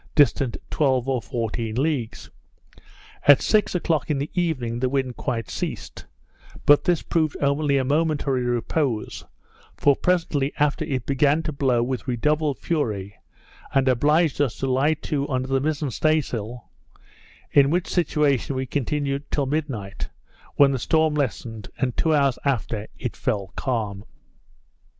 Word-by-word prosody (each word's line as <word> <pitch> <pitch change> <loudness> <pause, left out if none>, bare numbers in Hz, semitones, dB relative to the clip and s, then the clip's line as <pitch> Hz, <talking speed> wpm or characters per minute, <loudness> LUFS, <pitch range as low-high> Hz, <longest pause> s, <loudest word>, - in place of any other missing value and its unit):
distant 140 -4 +3
twelve 130 -4 +1
or 130 -3 0
fourteen 115 +1 -3
leagues. 135 -4 -2 1.0
At 145 -1 +9
six 210 -3 +2
o'clock 165 -3 0
in 150 - +1
the 140 +3 -3
evening 130 -10 -1
the 130 0 +1
wind 130 -2 -1
quite 115 -5 -3
ceased; - - -5 0.6
but 145 0 +6
this 175 -3 +2
proved 155 -3 0
only 140 0 +2
a 135 - +1
momentary 145 -2 +1
repose; 120 0 -1 0.5
for 140 -1 +4
presently 165 -6 0
after 145 -1 +1
it 130 -4 -3
began 145 +3 +2
to 155 - -2
blow 130 -4 +1
with 130 +2 -3
redoubled 150 +4 0
fury, 105 - -2 0.6
and 135 -1 +3
obliged 150 +5 +3
us 135 -6 +1
to - - -3
lie 140 +5 +2
to 145 -2 -3
under 130 -1 -1
the 135 0 +1
mizen 150 -1 -1
stay 155 +5 +2
sail; 120 -3 -6 0.8
in 140 -1 +5
which 175 +3 0
situation 150 -6 +1
we 130 0 -1
continued 140 +1 -2
till 145 - 0
midnight, 135 -9 -3 0.5
when 140 -1 +6
the 130 - -1
storm 160 +3 +2
lessened; 115 -6 -3
and 125 -4 -1
two 160 - +1
hours 140 -4 +2
after 115 -6 -1
it - - -4
fell 100 -3 -2
calm. 105 -6 -2
140 Hz, 145 wpm, -24 LUFS, 125-150 Hz, 1.0 s, At